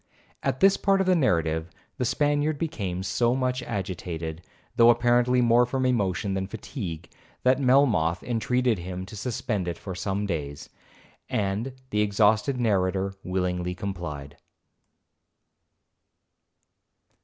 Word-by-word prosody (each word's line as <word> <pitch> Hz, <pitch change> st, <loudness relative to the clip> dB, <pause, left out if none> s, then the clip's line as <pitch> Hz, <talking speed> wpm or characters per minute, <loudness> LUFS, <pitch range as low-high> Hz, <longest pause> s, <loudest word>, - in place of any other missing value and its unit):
At 135 Hz, -1 st, -2 dB
this 195 Hz, 0 st, +6 dB
part 195 Hz, 0 st, +2 dB
of 190 Hz, -, +2 dB
the 185 Hz, -, +4 dB
narrative, 80 Hz, -, +1 dB, 0.3 s
the 125 Hz, -, -1 dB
Spaniard 145 Hz, +3 st, +1 dB
became 100 Hz, -, -3 dB
so 120 Hz, +6 st, +1 dB
much 130 Hz, -1 st, -1 dB
agitated, 85 Hz, -7 st, -4 dB, 0.3 s
though 115 Hz, 0 st, +7 dB
apparently 120 Hz, +1 st, +3 dB
more 120 Hz, 0 st, +5 dB
from 130 Hz, +1 st, -1 dB
emotion 100 Hz, -5 st, 0 dB
than 95 Hz, 0 st, -2 dB
fatigue, 95 Hz, -, -6 dB, 0.4 s
that 130 Hz, +1 st, +4 dB
Melmoth 120 Hz, -, +3 dB
intreated 120 Hz, -1 st, 0 dB
him 90 Hz, +1 st, -5 dB
to 105 Hz, -, -10 dB
suspend 105 Hz, -3 st, -2 dB
it 85 Hz, -, -3 dB
for 95 Hz, -, -7 dB
some 100 Hz, +2 st, -2 dB
days, 75 Hz, -7 st, -4 dB, 0.6 s
and 105 Hz, +5 st, -1 dB, 0.2 s
the 105 Hz, -, +1 dB
exhausted 105 Hz, +5 st, +2 dB
narrator 95 Hz, -3 st, +1 dB
willingly 90 Hz, -1 st, -2 dB
complied. 85 Hz, -8 st, -6 dB
105 Hz, 120 wpm, -26 LUFS, 90-125 Hz, 0.6 s, though